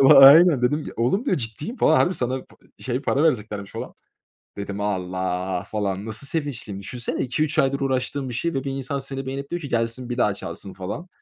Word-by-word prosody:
Aynen. 140 Hz, +2 st, +9 dB
Dedim 145 Hz, +5 st, +1 dB
ya -, -, -7 dB
oğlum 130 Hz, -, +1 dB
diyor 275 Hz, -, +2 dB
ciddiyim 145 Hz, -, -4 dB
falan. 155 Hz, -, +4 dB
Harbi 180 Hz, -, +3 dB
sana 130 Hz, -1 st, -2 dB
p -, -, -22 dB, 0.3 s
şey 130 Hz, +1 st, -1 dB
para 140 Hz, +2 st, +1 dB
vereceklermiş 105 Hz, -9 st, 0 dB
falan. -, -, -6 dB, 0.6 s
Dedim 100 Hz, 0 st, -5 dB
Allah 95 Hz, -2 st, -2 dB
falan. 100 Hz, -1 st, -2 dB
Nasıl 110 Hz, +5 st, -5 dB
sevinçliyim. 135 Hz, -11 st, -3 dB
Düşünsene 120 Hz, +5 st, -4 dB
2 125 Hz, +5 st, -1 dB
3 155 Hz, 0 st, -1 dB
aydır 135 Hz, 0 st, +2 dB
uğraştığım 130 Hz, 0 st, -1 dB
bir 120 Hz, -, -5 dB
şey 170 Hz, +5 st, -1 dB
ve 135 Hz, -, -2 dB
1 140 Hz, -, -2 dB
insan 135 Hz, +1 st, -3 dB
seni 135 Hz, 0 st, -5 dB
beğenip 140 Hz, +1 st, -5 dB
diyor 175 Hz, 0 st, -2 dB
ki 140 Hz, -, -6 dB
gelsin 115 Hz, +1 st, -1 dB
bir 120 Hz, -, -3 dB
daha 105 Hz, -4 st, +3 dB
çalsın 100 Hz, -1 st, -6 dB
falan. 100 Hz, -, -6 dB
130 Hz, 205 wpm, -23 LUFS, 105-140 Hz, 0.6 s, Aynen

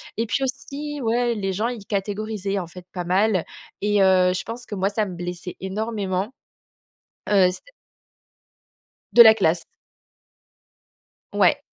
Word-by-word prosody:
Et 230 Hz, -, -1 dB
puis 235 Hz, -, -1 dB
aussi, 280 Hz, +2 st, -5 dB
ouais 235 Hz, 0 st, +1 dB
les 195 Hz, -2 st, -2 dB
gens 210 Hz, +5 st, -1 dB
ils 235 Hz, -4 st, -6 dB
catégorisaient 205 Hz, 0 st, -2 dB
en 185 Hz, -, -2 dB
fait 180 Hz, +1 st, -12 dB
pas 180 Hz, -2 st, -3 dB
mal 185 Hz, +1 st, +2 dB, 0.4 s
et 205 Hz, 0 st, +2 dB
heu, 185 Hz, -1 st, +5 dB
je 185 Hz, -, -3 dB
pense 235 Hz, +2 st, -7 dB
que -, -, -9 dB
moi 190 Hz, 0 st, +1 dB
ça 210 Hz, +1 st, 0 dB
me 185 Hz, -3 st, -7 dB
blessait 180 Hz, 0 st, -6 dB
énormément. 200 Hz, +1 st, -3 dB, 1.0 s
Heu, 195 Hz, -3 st, +5 dB
c 180 Hz, -, -5 dB, 1.6 s
De 240 Hz, -, +9 dB
la 220 Hz, -1 st, +8 dB
classe. 170 Hz, -5 st, +1 dB, 1.7 s
Ouais. -, -, +4 dB
205 Hz, 145 wpm, -23 LUFS, 185-225 Hz, 1.7 s, De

